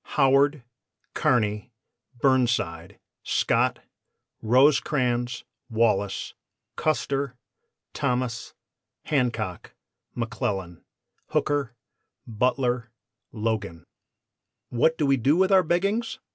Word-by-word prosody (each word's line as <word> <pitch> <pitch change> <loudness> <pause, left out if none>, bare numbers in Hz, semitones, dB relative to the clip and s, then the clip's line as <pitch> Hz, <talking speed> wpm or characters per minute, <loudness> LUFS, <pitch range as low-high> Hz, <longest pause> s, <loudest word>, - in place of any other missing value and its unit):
HOWARD 140 0 +4 0.5
KEARNY 105 0 +1 0.5
BURNSIDE 115 -10 +1 0.2
SCOTT - - +1 0.6
ROSECRANS 125 -1 +2 0.3
WALLACE 105 -4 0 0.4
CUSTER 140 -3 -1 0.6
THOMAS 125 -2 -2 0.5
HANCOCK 120 - -1 0.4
McCLELLAN 95 -7 -3 0.5
HOOKER 140 -5 0 0.5
BUTLER 120 +1 0 0.4
LOGAN 105 -6 -3 0.4
] - - -60
"What 160 +7 +2
do 150 - +1
we 135 -1 +3
do 140 +7 +2
with 190 +1 +3
our 190 -1 +7
beggings? 200 +8 0
125 Hz, 75 wpm, -25 LUFS, 110-140 Hz, 0.6 s, our